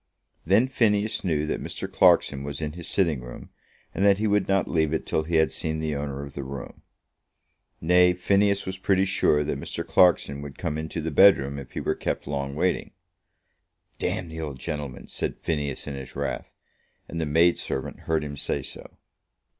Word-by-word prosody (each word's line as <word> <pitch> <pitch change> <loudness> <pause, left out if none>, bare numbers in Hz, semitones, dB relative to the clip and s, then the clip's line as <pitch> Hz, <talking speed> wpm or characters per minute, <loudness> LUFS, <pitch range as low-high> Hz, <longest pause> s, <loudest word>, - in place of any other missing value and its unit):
Then 105 +8 +5
Phineas 110 -4 +1
knew 80 -5 0
that 75 - -2
Mr. - - -5
Clarkson 70 -1 +4
was 70 0 -5
in 75 -1 -3
his 85 +1 -7
sitting 80 -9 +1
room, 60 -1 -10 0.4
and 95 - -1
that 100 -1 +5
he 110 - -1
would 105 -2 +2
not 95 -1 +2
leave 80 -1 +1
it - - -3
till - - 0
he 85 +1 -1
had 80 -1 +4
seen 80 0 -3
the 80 -1 -2
owner 70 -1 -4
of 70 -1 -9
the 70 - -5
room. 65 -1 -8 1.0
Nay, 90 +2 +5
Phineas 100 +2 +2
was 95 0 -5
pretty 95 0 +2
sure 75 -5 +2
that 75 - -3
Mr. - - -4
Clarkson 80 -6 +3
would 70 -1 -9
come 80 -3 -2
into 80 +1 -4
the 80 +1 -3
bedroom, 70 -5 +5
if 70 - -11
he - - -3
were - - 0
kept - - -3
long 70 -1 -3
waiting. 90 +4 0 1.1
"Damn 90 - -2
the 80 0 -6
old 75 -4 -5
gentleman," 70 -1 -5
said - - -3
Phineas 75 -3 -3
in 70 - -5
his 65 -1 -8
wrath; - - -4 0.5
and 85 - -4
the 80 - -1
maid 85 +4 +4
servant 70 +1 -4
heard 80 -1 -1
him 70 -1 -6
say - - -2
so. - - -10
80 Hz, 195 wpm, -26 LUFS, 70-90 Hz, 1.1 s, Then